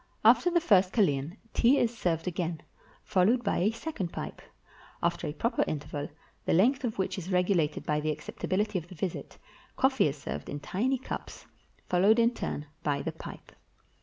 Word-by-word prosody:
After 355 - +6
the 345 0 +3
first 195 - +4
kalean, 160 - +1 0.2
tea 255 +5 +5
is 240 -2 +1
served 170 -6 -1
again, 170 -2 -2 0.4
followed 215 +5 +3
by 200 - +1
a 195 - +3
second 225 - -4
pipe. - - -6 0.6
After 170 0 0
a - - -2
proper 230 - +1
interval, 145 -1 -4 0.4
the - - +2
length 260 - +4
of 230 -3 -2
which 190 0 -1
is 185 +2 -6
regulated 180 -4 +1
by 150 0 +1
the 155 +1 -1
acceptability 185 +6 -1
of 170 - -12
the 180 - -11
visit, 175 +2 -4 0.4
coffee 265 - +4
is 145 +1 -3
served 145 - -6
in 145 - -4
tiny 230 - 0
cups, 260 - -7 0.4
followed 195 +5 +4
in 235 +1 +4
turn 150 -9 -4 0.2
by 140 -1 -1
the - - -2
pipe. - - -10
185 Hz, 175 wpm, -29 LUFS, 155-230 Hz, 0.6 s, After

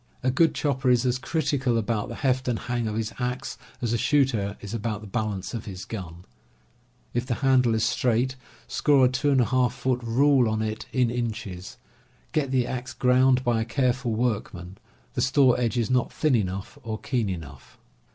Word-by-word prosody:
A 130 - +2
good 160 +5 +3
chopper 135 -3 0
is 125 0 +3
as 125 0 +1
critical 135 -5 0
about 110 -1 -1
the - - -6
heft 130 -1 0
and 120 -2 +1
hang 120 -1 -2
of 105 - -3
his 110 0 -2
axe 125 +1 -3 0.3
as 120 -1 0
a 120 - +1
shooter 115 -8 +1
is 105 0 -8
about 110 -2 -3
the - - -9
bal 110 +1 -2
ance 95 -2 -6
of 115 - -5
his 95 -2 -7
gun. 90 -5 -7 0.9
If 120 +1 -1
the 120 - 0
handle 125 -3 +4
is 110 - +1
straight, 125 +2 +1 0.3
score 140 -3 +4
a - - +4
2^ 130 -2 +2
foot 125 -1 -1
rule 125 +1 +3
on 110 0 -1
it, 110 0 -4
in 125 -3 +2
inches. 110 -6 -4 0.5
Get 150 -4 0
the 130 -2 +2
axe 130 +1 -5
ground 130 0 +4
by 120 -2 +1
a - - +1
careful 125 0 0
workman. 100 -6 -3 0.3
The - - -1
store 130 0 +4
edge 120 0 0
is 120 0 0
not 125 -1 +1
thin 155 -3 +1
enough 95 -3 -3
or 110 -2 -4
keen 120 -5 -1
enough. 80 -7 -8
120 Hz, 190 wpm, -26 LUFS, 110-130 Hz, 0.9 s, handle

